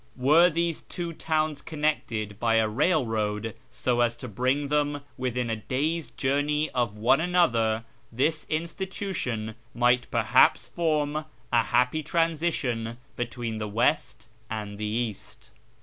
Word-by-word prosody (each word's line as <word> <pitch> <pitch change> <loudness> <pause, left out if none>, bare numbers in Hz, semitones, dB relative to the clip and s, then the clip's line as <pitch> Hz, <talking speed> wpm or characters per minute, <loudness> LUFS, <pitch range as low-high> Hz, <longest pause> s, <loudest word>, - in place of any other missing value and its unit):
"Were 155 +7 +6
these 170 0 -1
two 170 -1 -5
towns 155 -2 -1
connected 115 -10 -2
Ijy 115 -1 +3
a - - +1
railroad, 110 - 0 0.2
so 120 -1 -1
as 120 -1 +2
to 125 - -8
bring 130 +6 0
them 145 -1 +1
within 125 -2 -2
a - - +1
day's 150 +9 -2
journey 145 +3 0
of 120 -4 -1
one 120 +7 +4
another, 115 -11 +2 0.3
this 150 +6 0
institution 165 - -3 0.2
might 120 0 +3
perhaps - - +4
form 155 -2 0 0.3
a 115 -1 +5
happy 125 +7 +2
transition 150 -8 0 0.2
between 120 -2 -3
the 105 - -3
west 110 0 0 0.2
and 105 -2 -5
the 105 - -2
east. 110 0 -4
125 Hz, 130 wpm, -27 LUFS, 115-155 Hz, 0.3 s, Were